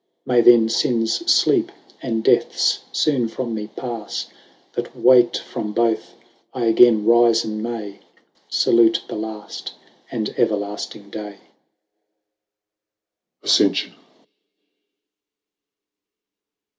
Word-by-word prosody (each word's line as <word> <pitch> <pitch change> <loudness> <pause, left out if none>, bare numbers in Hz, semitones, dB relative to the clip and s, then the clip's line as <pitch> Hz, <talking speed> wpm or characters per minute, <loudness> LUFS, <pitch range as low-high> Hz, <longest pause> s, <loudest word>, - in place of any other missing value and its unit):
May 125 -1 +3
then 115 -1 +6
finnes 115 0 0
fleep, 350 -3 +3 0.3
and 115 -3 -3
deaths - - +2
foone 135 -6 0
from 120 0 -5
me 105 -1 -5
pafle, 115 -1 -6 0.4
That - - -5
wak't 125 -1 +4
from 105 -3 -6
both, 115 -1 -1 0.4
I 125 -2 -2
againe 115 -1 +4
rifen 115 -2 +3
may 110 -4 -6 0.5
Salute 115 -1 +3
the - - -8
tafty 110 -1 -7 0.4
and 110 -3 -3
everlafting 105 -2 -3
day. 105 -1 -7 2.1
ASCENTION. - - +2
115 Hz, 90 wpm, -20 LUFS, 105-120 Hz, 2.1 s, then